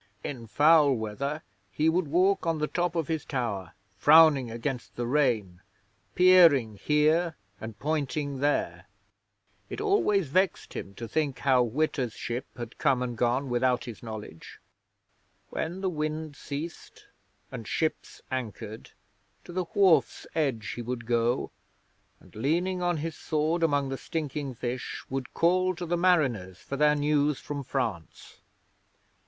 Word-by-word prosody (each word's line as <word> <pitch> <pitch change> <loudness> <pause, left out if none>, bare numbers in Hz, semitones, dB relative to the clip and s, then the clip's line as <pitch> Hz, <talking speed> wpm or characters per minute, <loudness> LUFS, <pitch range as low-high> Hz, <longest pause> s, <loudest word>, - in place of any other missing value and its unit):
In 120 -5 -6
foul 150 +4 +5
weather 135 +8 -4 0.3
he 155 +8 +1
would 165 0 +2
walk 185 +4 +2
on 165 -1 +1
the 150 - 0
top 175 +2 -1
of 165 -3 -1
his 160 -3 -2
tower, 105 - -3 0.3
frowning 150 -2 +6
against 120 +2 -5
the 120 - -2
rain 120 -10 0 0.5
peering 165 - +6
here 155 - +2 0.2
and 110 -1 -8
pointing 145 -2 -2
there. 145 +1 -1 0.8
It - - -6
always 390 - +2
vexed 185 +6 0
him 100 - -7
to 115 - -6
think 145 +2 -1
how 130 -2 +3
Witta's 125 -1 -1
ship 120 +3 -4
had 120 -1 -8
come 135 -4 +2
and 120 -1 -4
gone 125 +4 +1
without 125 0 +1
his 120 -6 -9
knowledge. 110 -8 -9 0.9
When 175 +4 -3
the 190 - 0
wind 155 -1 -3
ceased 150 +4 -7 0.5
and 115 -5 -7
ships 160 -1 -2
anchored, 110 -3 -5 0.5
to - - -11
the 185 0 -1
wharf's 190 -5 +3
edge 135 -10 -1
he 120 - -5
would 120 0 -5
go 120 +1 0 0.7
and, - - -20
leaning 175 - 0
on 175 -1 +1
his 160 +1 -4
sword 155 +2 -1
among 145 -4 +1
the 135 - -4
stinking 145 -4 -4
fish, 120 +2 -4
would 135 -2 -4
call 185 +2 +2
to 175 +1 -5
the 175 +1 0
mariners 135 - +1
for 140 - -6
their 150 +1 +4
news 145 -1 +1
from 145 -1 -5
France. 115 - -4
145 Hz, 145 wpm, -28 LUFS, 120-160 Hz, 0.9 s, frowning